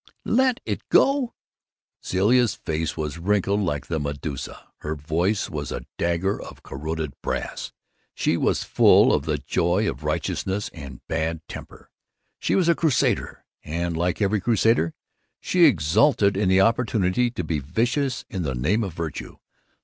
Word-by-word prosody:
"Let 255 0 +2
it - - -2
go?" 275 -3 +3 0.7
Zilla's 110 +5 +2
face 80 +1 -3
was 75 +1 -4
wrinkled 100 +2 +1
like 85 -8 -1
the 80 -2 -2
Medusa, 70 -1 -5
her 75 +1 -4
voice 85 +7 0
was 75 -2 -5
a - - -5
dagger 85 +4 0
of - - -11
corroded 80 +1 -4
brass. - - -4 0.4
She - - +1
was - - +1
full - - +5
of 70 - 0
the 75 -1 0
joy 85 +8 0
of 65 -2 -4
righteousness 85 +6 -2
and 70 -5 -10
bad 80 0 -2
temper. - - -11 0.5
She - - 0
was 185 -3 +2
a 170 - +6
crusader 155 -6 0 0.2
and, 85 +1 -2
like 90 +5 0
every 100 +1 +1
crusader, 110 -6 +2 0.4
she 180 -2 +4
exulted 100 - +3
in 95 -1 +1
the 95 +1 +5
opportunity 115 0 +2
to 105 -6 -4
be 80 -1 -1
vicious 120 - -1
in 95 -7 -4
the 70 -6 -2
name 90 - +1
of 95 -5 -4
virtue. 80 -1 -6
90 Hz, 150 wpm, -24 LUFS, 80-110 Hz, 0.7 s, a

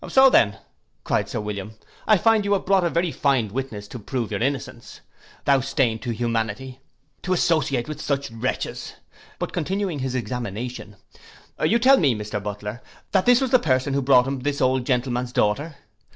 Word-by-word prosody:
'—'So 265 0 +5
then,' 100 -3 +4 0.5
cried - - 0
Sir - - -3
William, 105 0 -5 0.3
'I 215 - +6
find 225 +2 +3
you 200 0 +1
have 195 - 0
brought 195 -1 +3
a 170 - +2
very 170 +1 0
fine 135 -8 +1
witness 110 -3 -5
to 125 - -7
prove 115 +1 -4
your 100 - -2
innocence: 135 -1 -4 0.4
thou 140 -1 +4
stain 130 -4 0
to 120 - -6
humanity! 115 +2 -2 0.4
to 185 - -1
associate 140 -8 +1
with 155 - -6
such 140 -2 -2
wretches!' 115 +3 -4 0.4
(But - - -4
continuing 185 -1 -2
his 130 -1 -3
examination) 120 -2 -5 0.7
'You 230 - +4
tell 260 +3 +6
me, 140 -8 +3
Mr 105 0 -4
Butler, 105 +3 -6 0.3
that 190 +1 +2
this 245 +1 +6
was 260 -2 -1
the 255 - +6
person 130 - 0
who 140 - +1
brought 125 -2 +5
him 135 0 -3
this 140 +2 -2
old 130 -2 +1
gentleman's 125 -1 -1
daughter. 140 +11 0
130 Hz, 180 wpm, -23 LUFS, 115-160 Hz, 0.7 s, I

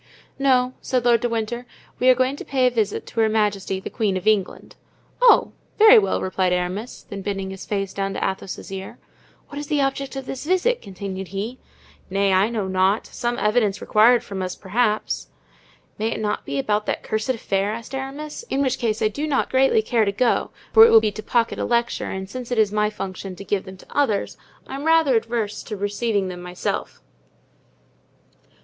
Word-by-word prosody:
"No," 255 -2 +3
said 250 -2 -1
Lord 235 -2 +4
de 240 - 0
Winter, 230 +2 -3 0.3
"we 255 - +4
are 255 - +7
going 255 +2 +1
to - - -7
pay 265 -2 +1
a 250 - +4
visit 220 -4 -1
to 230 - -6
Her 220 -1 +4
Majesty 205 -3 0
the - - -7
Queen 205 -5 0
of 185 - -6
England." 210 -3 0 0.5
"Oh, - - +6 0.3
very 440 +2 +9
well," 410 - 0
replied 185 -1 0
Aramis; 180 +6 -3
then 200 -1 -6
bending 195 -1 -3
his 190 0 -9
face 195 -2 -2
down 195 -1 -2
to - - 0
Athos's 190 0 -8
ear, 190 0 -7 0.5
"what 285 - -6
is 290 - -6
the 295 -3 +1
object 270 0 -2
of 270 -1 -5
this 260 - -6
visit?" 375 +9 +1
continued 195 -1 -6
he. 210 +7 -5 0.5
"Nay, 195 0 +2
I 190 +4 +3
know 215 -5 -2
not; 190 +3 +2
some 240 0 -3
evidence 210 -2 +1
required 230 +3 +4
from 195 -2 -5
us, 185 -1 -3
perhaps." 215 +2 -1 0.7
"May 220 - 0
it 230 - -2
not 210 -1 -2
be 140 - -3
about 210 +9 0
that - - -2
cursed 215 +2 -2
affair?" 205 -4 0
asked 230 +3 -7
Aramis, 275 +3 -5
"in 275 +1 +1
which 265 -1 0
case 220 -3 -1
I - - +5
do 285 +8 -3
not 280 -3 0
greatly 260 -4 +4
care 225 0 +2
to 200 - +1
go, 240 +5 +1 0.2
for 445 - +10
it 455 - +8
will 225 - +8
be 215 -1 0
to 215 - -7
pocket 230 +2 0
a - - -1
lecture; 235 0 0
and 190 0 -5
since 245 +4 -7
it 245 - -1
is 215 -2 +3
my 210 0 +1
function 195 -2 -6
to 200 - -9
give 200 -1 -1
them 190 0 -10
to - - -16
others 260 -8 +1 0.3
I - - -9
am 275 +2 -5
rather 320 -5 +4
averse 225 -2 -1
to 210 - -6
receiving 205 0 -1
them 180 -1 -7
myself." 180 0 -4
215 Hz, 205 wpm, -22 LUFS, 195-250 Hz, 0.7 s, for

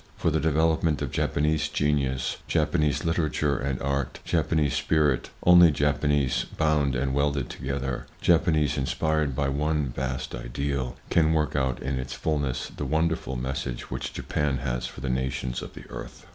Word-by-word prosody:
For 85 - +1
the 80 - +1
development 80 -1 +2
of 65 - -3
Japanese 75 +1 +1
genius, 70 -3 0
Japanese 75 +1 +1
literature 75 -3 +1
and 65 -1 -2
art, 70 -1 -1
Japanese 80 -3 +1
spirit, 75 -5 +1
only 90 -1 +8
Japanese, 70 -3 +1
bound 75 -4 +1
and 65 +1 0
welded 70 -2 0
together, 65 -1 -3
Japanese 80 -5 +3
inspired 75 +1 0
by 70 +1 0
one 75 0 0
vast 65 +1 -3
ideal, 65 +2 -3 0.2
can 80 -1 +4
work 75 -2 0
out 65 -3 0
in 65 0 -1
its 65 +1 -5
fullness 70 -2 -1
the - - -6
wonderful 80 -3 0
message 60 -1 -4
which - - -3
Japan 70 -2 -1
has 60 -3 -2
for - - -10
the 70 - -3
nations 65 -1 -2
of - - -9
the - - -11
earth. - - -8
70 Hz, 155 wpm, -26 LUFS, 65-75 Hz, 0.2 s, only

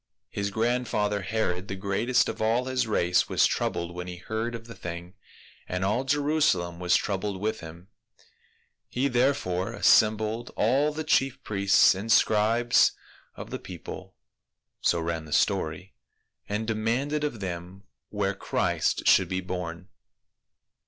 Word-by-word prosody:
His 100 0 -2
grandfather 110 -2 0
Herod, 95 -2 -2
the 95 - -4
greatest 100 +6 +1
of - - -5
all 115 +3 +1
his 130 -2 -1
race, 90 -4 +2
was - - +4
troubled 85 0 -1
when 90 +1 -6
he 90 - -6
heard 110 +5 -3
of 115 0 -9
the 115 - -10
thing, 85 -1 -7 0.6
and 90 +1 -1
all 120 +7 0
Jerusalem 140 - +1
was 90 -1 +2
troubled 100 0 -1
with 110 +2 -2
him, 85 +2 -11 1.0
he 130 +3 0
therefore 120 -8 0
as - - -3
sembled 110 +2 +3
all 130 +7 +2
of 150 - -3
the 155 - -3
chief 135 -3 +1
priests 100 -2 +4
and 105 +4 -4
scribes 115 +1 +4 0.4
of - - -9
the - - -4
j)eople - - -9 0.3
— - - -60 0.3
so 85 - +2
ran 80 -1 -3
the 75 - -12
story 90 +5 0 0.3
— - - -37
and 105 +2 -2
demanded 120 +7 -1
of 145 -7 -2
them 90 +1 -6 0.3
where 100 -1 -1
Christ - - -1
should 95 -3 +5
be 95 -1 -1
born. 90 -1 -5
105 Hz, 150 wpm, -27 LUFS, 90-120 Hz, 1.0 s, should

